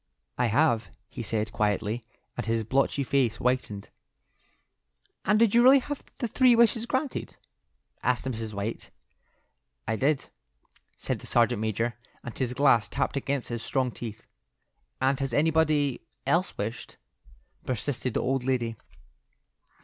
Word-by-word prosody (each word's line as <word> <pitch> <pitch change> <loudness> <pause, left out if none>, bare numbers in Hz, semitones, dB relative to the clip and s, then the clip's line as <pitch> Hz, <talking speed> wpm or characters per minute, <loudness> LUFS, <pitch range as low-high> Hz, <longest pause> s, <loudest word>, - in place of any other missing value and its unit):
"I 125 - +1
have," 120 -1 +2 0.2
he - - -6
said, 110 -1 -1
quietly, 105 +2 -1 0.3
and - - -4
his 115 0 +1
blotchy 135 +4 +1
face 130 -4 +1
whitened. 125 -5 -1 1.4
"And 210 +3 +4
did 225 -2 +4
you 235 - +6
really 260 +3 +8
have 290 +2 -4
the 240 - -2
three 250 +2 +5
wishes 230 0 +4
granted?" 260 +2 -2 0.6
asked 125 +1 0
Mrs. 115 -4 -3
White. 105 +2 -4 1.0
"I 110 - 0
did," 140 +4 +1 0.7
said - - -2
the - - -11
sergeant 120 -2 +2
major, 115 +2 -1 0.2
and 120 - -7
his 125 -2 -2
glass 130 -6 +4
tapped - - -1
against 140 -1 -2
his 120 -1 -3
strong 130 -1 0
teeth. 110 -2 -7 0.7
"And 135 +1 +2
has 135 -3 -2
anybody 155 -3 +2 0.2
else 180 +3 +1
wished?" 110 +4 -5 0.7
persisted 125 0 -2
the - - +2
old 135 0 0
lady. 120 -3 -1
125 Hz, 135 wpm, -27 LUFS, 115-145 Hz, 1.4 s, really